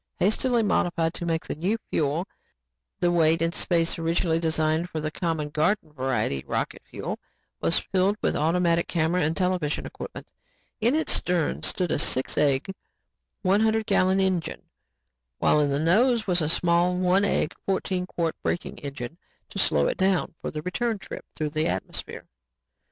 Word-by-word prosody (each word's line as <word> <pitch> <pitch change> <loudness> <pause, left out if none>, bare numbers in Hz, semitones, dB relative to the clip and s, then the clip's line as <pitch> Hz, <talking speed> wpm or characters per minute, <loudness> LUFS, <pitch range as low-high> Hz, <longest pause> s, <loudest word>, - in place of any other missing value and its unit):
Hastily 235 +4 +2
modified 170 -5 +1
to 170 - -5
take 165 -1 -1
the - - -3
new 185 +9 -1
fuel, 155 +4 0 0.7
the 175 - +2
weight 165 -1 +3
and 165 +1 0
space 170 -2 +1
originally 165 0 +1
designed 160 +1 0
for 160 - -4
the 155 0 -3
common 160 -3 -2
garden 155 +1 0
variety 130 - -1
of - - -22
rocket - - -2
fuel - - -5 0.4
was 165 - +3
filled 195 +2 +1
with - - 0
automatic 170 +2 +2
camera 170 +2 +1
and 160 +1 0
television 180 -5 0
equipment. - - -8 0.5
In 240 +5 +3
its 320 - +1
stern 175 -3 0
stood 180 -4 0
a - - +1
six 130 -2 +1
egg, 145 +5 +2 0.7
one 195 +2 +3
hundred 220 0 +2
gallon 190 0 +3
engine, 190 -3 0 0.7
while 150 - +3
in 145 - +2
the 140 0 0
nose 220 - +3
was 180 -3 +2
a 155 - 0
small, 175 +2 +2
one 185 +2 +3
egg, 200 - +1
fourteen 185 -1 -1
quart 165 -3 -2
braking 175 - -3
engine 140 +2 -6 0.3
to - - -5
slow 75 -2 +3
it - - 0
down 190 -2 +2
for - - -3
the 150 0 -5
return 225 +5 -1
trip - - -9
through 155 -1 -2
the 155 +1 0
atmosphere. 90 +1 -4
170 Hz, 170 wpm, -26 LUFS, 155-185 Hz, 0.7 s, weight